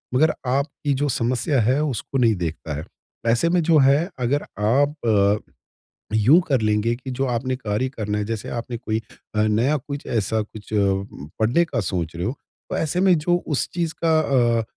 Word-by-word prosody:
मगर 155 Hz, +4 st, +4 dB
आप 135 Hz, +3 st, +2 dB, 0.2 s
की 145 Hz, -2 st, +2 dB
जो 145 Hz, +2 st, 0 dB
समस्या 125 Hz, +2 st, +1 dB
है 130 Hz, +7 st, +2 dB
उसको 135 Hz, -1 st, -2 dB
नहीं 115 Hz, -4 st, +3 dB
देखता 80 Hz, -3 st, -4 dB
हैं। 75 Hz, -, -6 dB, 0.5 s
ऐसे 120 Hz, +8 st, +2 dB
में 175 Hz, 0 st, +3 dB
जो 160 Hz, -1 st, +4 dB
है 140 Hz, +6 st, +4 dB
अगर 130 Hz, +4 st, 0 dB, 0.2 s
आप 110 Hz, -5 st, +2 dB, 0.7 s
यूँ 115 Hz, +10 st, +6 dB
कर 135 Hz, -4 st, +2 dB
लेंगे 110 Hz, +2 st, +1 dB
कि 130 Hz, +2 st, -7 dB
जो 135 Hz, +2 st, -1 dB
आपने 130 Hz, +1 st, -1 dB
कार्य 115 Hz, +1 st, -2 dB
करना 105 Hz, -1 st, -2 dB
हैं 105 Hz, -, -1 dB
जैसे 110 Hz, -1 st, -4 dB
आपने 120 Hz, 0 st, -4 dB
कोई 110 Hz, -1 st, -2 dB, 0.3 s
अ, 105 Hz, -, +3 dB
नया 115 Hz, +8 st, +2 dB
कुछ 140 Hz, +1 st, -7 dB
ऐसा 110 Hz, -1 st, 0 dB
कुछ 105 Hz, 0 st, -10 dB
अ, 105 Hz, -, +2 dB, 0.6 s
पढ़ने 120 Hz, +11 st, +3 dB
का 130 Hz, -8 st, -2 dB
सोच 85 Hz, -4 st, -2 dB
रहे 85 Hz, -, -3 dB
हो, 115 Hz, -, 0 dB, 0.4 s
तो -, -, -2 dB
ऐसे 160 Hz, +3 st, 0 dB
में 185 Hz, -3 st, +5 dB
जो 175 Hz, +3 st, +1 dB
उस 145 Hz, -4 st, 0 dB
चीज़ 165 Hz, -2 st, -1 dB
का 160 Hz, -1 st, +4 dB, 0.4 s
अ, -, -, -1 dB
125 Hz, 190 wpm, -22 LUFS, 110-145 Hz, 0.7 s, यूँ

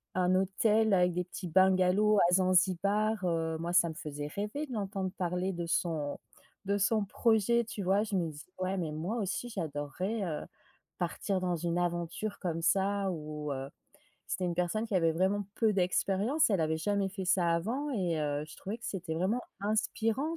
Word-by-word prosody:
un 185 Hz, 0 st, +3 dB
hôtel 210 Hz, +3 st, +2 dB
avec 180 Hz, -1 st, +4 dB
des 180 Hz, +1 st, -1 dB
petits 180 Hz, +1 st, -6 dB
bungalows 190 Hz, +3 st, +4 dB
à -, -, +1 dB
Zanzibar, 190 Hz, +3 st, +2 dB
heu, 165 Hz, -2 st, 0 dB
moi 170 Hz, +2 st, -3 dB
ça 170 Hz, -, +5 dB
me 160 Hz, -, -5 dB
faisait 145 Hz, -2 st, -5 dB
rêver 210 Hz, -, -3 dB
de 255 Hz, -, -7 dB
l'entendre 195 Hz, -3 st, -2 dB
parler 180 Hz, +1 st, -1 dB
de 170 Hz, 0 st, -3 dB
son, 160 Hz, -4 st, -1 dB, 0.5 s
de 200 Hz, +1 st, +1 dB
son 210 Hz, +1 st, +2 dB
projet, 230 Hz, +2 st, +2 dB
tu 215 Hz, -2 st, -6 dB
vois? 195 Hz, +3 st, +3 dB
Je 210 Hz, -2 st, -3 dB
me 170 Hz, -3 st, +1 dB
dis: 145 Hz, 0 st, -11 dB
«Ouais, 185 Hz, +1 st, -1 dB
mais 165 Hz, -4 st, -2 dB
moi 175 Hz, +10 st, -3 dB
aussi 205 Hz, +3 st, -2 dB
j'adorerais 180 Hz, +3 st, -3 dB
heu, 160 Hz, -4 st, -3 dB, 0.6 s
partir 185 Hz, +2 st, -1 dB
dans 180 Hz, -1 st, 0 dB
une 170 Hz, +1 st, -1 dB
aventure 175 Hz, +4 st, -2 dB
comme 165 Hz, -3 st, -2 dB
ça», 195 Hz, +2 st, +2 dB
ou 150 Hz, -2 st, -5 dB
heu 135 Hz, 0 st, -4 dB, 0.6 s
c'était 185 Hz, -, -2 dB
une 175 Hz, -, -1 dB
personne 180 Hz, +6 st, 0 dB
qui 220 Hz, -, -4 dB
avait 165 Hz, -2 st, +3 dB
vraiment 190 Hz, +4 st, +1 dB
peu 220 Hz, -2 st, +3 dB
d'expérience. 200 Hz, -, +2 dB
Elle 195 Hz, -5 st, +2 dB
avait 160 Hz, 0 st, +1 dB
jamais 200 Hz, +2 st, 0 dB
fait 190 Hz, -1 st, -5 dB
ça 180 Hz, -2 st, +3 dB
avant 235 Hz, -, -1 dB
et 180 Hz, -, 0 dB
heu, 145 Hz, 0 st, -1 dB
je 155 Hz, -, -12 dB
trouvais 210 Hz, +5 st, -5 dB
que -, -, -14 dB
c'était 180 Hz, -4 st, -4 dB
vraiment 190 Hz, +9 st, 0 dB, 0.2 s
inspirant, 225 Hz, +8 st, 0 dB
185 Hz, 185 wpm, -31 LUFS, 170-205 Hz, 0.6 s, ça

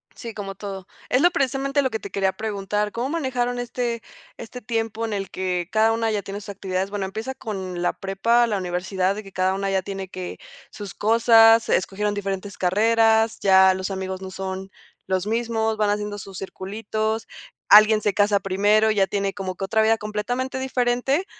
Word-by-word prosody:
Sí, 230 Hz, -1 st, -8 dB
como 195 Hz, -2 st, -6 dB
todo. 195 Hz, -1 st, -7 dB, 0.2 s
Es 255 Hz, -, +3 dB
lo 350 Hz, -, +6 dB
precisamente 275 Hz, -2 st, 0 dB
lo 260 Hz, -, +1 dB
que 220 Hz, -, -2 dB
te 200 Hz, -, -8 dB
quería 195 Hz, -1 st, 0 dB
preguntar. 210 Hz, 0 st, -2 dB
¿Cómo 240 Hz, +5 st, -3 dB
manejaron 250 Hz, -6 st, -1 dB
este, 240 Hz, -1 st, -3 dB, 0.4 s
este 240 Hz, +2 st, -9 dB
tiempo 225 Hz, -1 st, -2 dB
en 220 Hz, -, -3 dB
el 195 Hz, -2 st, -3 dB
que 180 Hz, -2 st, -2 dB
cada 220 Hz, +1 st, +3 dB
una 225 Hz, 0 st, 0 dB
ya 210 Hz, -2 st, -1 dB
tiene 200 Hz, +1 st, -6 dB
sus 205 Hz, -, -11 dB
actividades? 190 Hz, -1 st, -3 dB
Bueno, 200 Hz, -1 st, -3 dB
empieza 220 Hz, +7 st, -5 dB
con 190 Hz, -6 st, -5 dB
la -, -, +1 dB
prepa, 230 Hz, +5 st, +1 dB
la 210 Hz, -3 st, -1 dB
universidad, 185 Hz, +1 st, -1 dB
de 210 Hz, -, -5 dB
que 195 Hz, -, -13 dB
cada 185 Hz, 0 st, +1 dB
una 195 Hz, 0 st, -2 dB
ya 190 Hz, -1 st, +1 dB
tiene 195 Hz, 0 st, -5 dB
que 185 Hz, -1 st, -7 dB, 0.3 s
sus 205 Hz, -2 st, -8 dB
cosas, 225 Hz, +1 st, +5 dB
escogieron 205 Hz, +2 st, 0 dB
diferentes 195 Hz, -1 st, -4 dB
carreras, 225 Hz, +3 st, +3 dB
ya 190 Hz, -1 st, +6 dB
los 190 Hz, +1 st, -4 dB
amigos 190 Hz, 0 st, -4 dB
no 190 Hz, 0 st, -7 dB
son 190 Hz, 0 st, -5 dB, 0.3 s
los 190 Hz, +1 st, -1 dB
mismos, 225 Hz, -1 st, 0 dB
van 210 Hz, -1 st, +2 dB
haciendo 210 Hz, 0 st, -3 dB
sus 195 Hz, -1 st, -9 dB
circulitos, 215 Hz, +3 st, -3 dB, 0.4 s
alguien 215 Hz, +1 st, +7 dB
se 205 Hz, -1 st, +1 dB
casa 205 Hz, 0 st, +3 dB
primero, 205 Hz, +3 st, +2 dB
ya 200 Hz, -2 st, +3 dB
tiene 195 Hz, +1 st, -1 dB
como 190 Hz, -2 st, -5 dB
que 195 Hz, -, -4 dB
otra 220 Hz, +3 st, +2 dB
vida 225 Hz, +1 st, +3 dB
completamente 245 Hz, +5 st, -3 dB
diferente 260 Hz, +5 st, 0 dB
210 Hz, 190 wpm, -23 LUFS, 195-225 Hz, 0.4 s, alguien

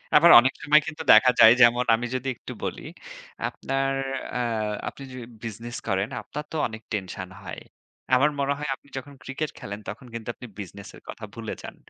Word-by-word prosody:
আবার 165 Hz, +3 st, +8 dB
অনেক 130 Hz, +2 st, +2 dB
সময় 150 Hz, +1 st, +5 dB
কিন্তু 160 Hz, 0 st, -5 dB
দেখা 125 Hz, -, +8 dB
যায় 110 Hz, -, +10 dB
যেমন 120 Hz, +1 st, +6 dB
আমি 120 Hz, +2 st, -4 dB
যদি 130 Hz, +1 st, -3 dB
একটু -, -, -9 dB
বলি, -, -, -3 dB, 0.7 s
আপনার 135 Hz, 0 st, -2 dB, 0.4 s
আ -, -, 0 dB, 0.5 s
আপনি 140 Hz, -, -7 dB
যদি 130 Hz, -1 st, -8 dB, 0.2 s
business 115 Hz, +2 st, -6 dB
করেন 95 Hz, 0 st, 0 dB
আপনার 150 Hz, +1 st, -6 dB
তো -, -, -6 dB
অনেক 110 Hz, 0 st, -9 dB
tension 95 Hz, -2 st, -4 dB
হয়। -, -, -7 dB, 0.5 s
আমার 135 Hz, +4 st, +5 dB
মনে 140 Hz, 0 st, +1 dB
হয় 150 Hz, -1 st, -4 dB
আপনি 135 Hz, -, -27 dB
যখন 140 Hz, +2 st, -7 dB
Cricket 145 Hz, +3 st, -3 dB
খেলেন 100 Hz, +1 st, -6 dB
তখন 115 Hz, +4 st, -7 dB
কিন্তু 115 Hz, -1 st, -7 dB
আপনি 125 Hz, -, -10 dB
business 100 Hz, +1 st, -8 dB
এর -, -, -15 dB
কথা 110 Hz, -, -9 dB
ভুলে 115 Hz, -2 st, -5 dB
যান। -, -, -9 dB
125 Hz, 185 wpm, -25 LUFS, 110-140 Hz, 0.7 s, যায়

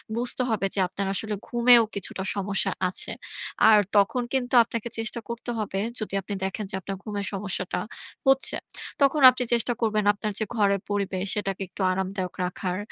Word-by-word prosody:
বুঝতে 245 Hz, +2 st, -1 dB
হবে 215 Hz, -3 st, 0 dB
যে -, -, -1 dB
আপনার 195 Hz, +1 st, -4 dB
আসলে 210 Hz, +2 st, -2 dB
ঘুমেও 240 Hz, -1 st, +6 dB
কিছুটা 195 Hz, 0 st, -5 dB, 0.2 s
সমস্যা 195 Hz, 0 st, -1 dB, 0.2 s
আছে। 180 Hz, -, -4 dB, 0.6 s
আর 215 Hz, -, +8 dB, 0.2 s
তখন 200 Hz, +5 st, +3 dB
কিন্তু 255 Hz, -1 st, -1 dB
আপনাকে 230 Hz, 0 st, -5 dB
চেষ্টা 225 Hz, +1 st, -3 dB
করতে 235 Hz, +1 st, -4 dB
হবে, 195 Hz, -2 st, -2 dB, 0.2 s
যদি 215 Hz, -, -5 dB
আপনি 200 Hz, -, -6 dB
দেখেন 205 Hz, +2 st, -3 dB
যে -, -, -3 dB
আপনার 195 Hz, +1 st, -5 dB
ঘুমের 205 Hz, -2 st, -3 dB
সমস্যাটা 190 Hz, -2 st, -2 dB, 0.5 s
হচ্ছে, 270 Hz, 0 st, +3 dB, 0.5 s
তখন 280 Hz, +1 st, +4 dB
আপনি 255 Hz, 0 st, -1 dB
চেষ্টা 240 Hz, +1 st, +2 dB
করবেন 215 Hz, -2 st, +1 dB
আপনার 210 Hz, +1 st, -3 dB
যে 220 Hz, -, 0 dB
ঘরের 200 Hz, -3 st, +2 dB
পরিবেশ, 200 Hz, -2 st, -1 dB
সেটাকে 195 Hz, -2 st, -2 dB
একটু -, -, -8 dB
আরামদায়ক 190 Hz, 0 st, -2 dB
রাখার, 180 Hz, 0 st, -3 dB
205 Hz, 165 wpm, -26 LUFS, 195-235 Hz, 0.6 s, আর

